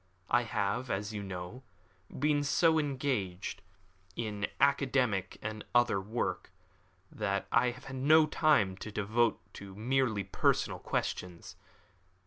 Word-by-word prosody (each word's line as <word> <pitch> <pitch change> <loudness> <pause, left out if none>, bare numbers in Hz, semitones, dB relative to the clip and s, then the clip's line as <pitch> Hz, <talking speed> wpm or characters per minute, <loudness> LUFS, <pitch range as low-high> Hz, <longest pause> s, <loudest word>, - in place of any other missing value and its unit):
I - - +5
have, 110 +4 -1
as 100 +1 -2
you 105 - -4
know, 95 +5 -7 0.5
been 145 +1 +1
so 160 +2 +3
engaged 130 -11 -2 0.5
in 105 -3 -2
academical 130 -8 +2
and 110 0 -4
other 120 -5 +4
work, 110 +5 -3 0.6
that 100 -2 -1
I 125 +1 +4
have 120 +1 -9
had 135 -1 -6
no 155 +4 +6
time 150 - +2
to 110 - -7
devote 110 +3 +1
to 100 -1 -10
merely 120 -1 0
personal 95 - 0
questions. 90 -2 -4
110 Hz, 120 wpm, -31 LUFS, 100-135 Hz, 0.6 s, no